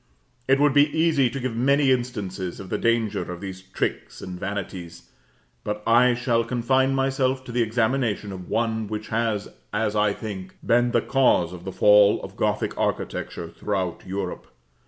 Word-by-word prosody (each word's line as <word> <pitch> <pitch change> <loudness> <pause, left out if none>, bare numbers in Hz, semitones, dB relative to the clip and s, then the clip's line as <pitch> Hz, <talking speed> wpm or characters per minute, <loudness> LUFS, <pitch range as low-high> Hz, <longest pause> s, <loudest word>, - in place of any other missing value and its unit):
It 135 +1 +4
would 145 -1 +4
be 145 +1 +5
easy 155 -6 +3
to 135 - -5
give 125 -2 -3
many 135 +3 +3
instances 105 -8 -2
of 95 - -9
the - - -1
danger 115 -5 0
of 90 - -6
these 95 -1 -7
tricks 95 0 -4
and 90 -1 -7
vanities; 95 -3 -6 0.5
but 105 0 -4
I 120 +2 +5
shall 120 -1 +1
confine 130 +3 +1
myself 135 -1 0
to 125 - -9
the 120 0 +1
examination 115 -2 0
of 90 -2 -8
one 110 -1 0
which 105 0 -5
has, 110 -2 -1 0.2
as 105 0 -1
I 105 -1 +2
think, 95 -4 -7
been 120 +1 +3
the - - +2
cause 125 -10 +2
of 90 -1 -10
the 95 - -4
fall 105 +1 +5
of - - -8
Gothic - - -1
architecture 85 - -2
throughout 95 -4 -3
Europe. 95 -1 -4
110 Hz, 170 wpm, -24 LUFS, 100-125 Hz, 0.5 s, be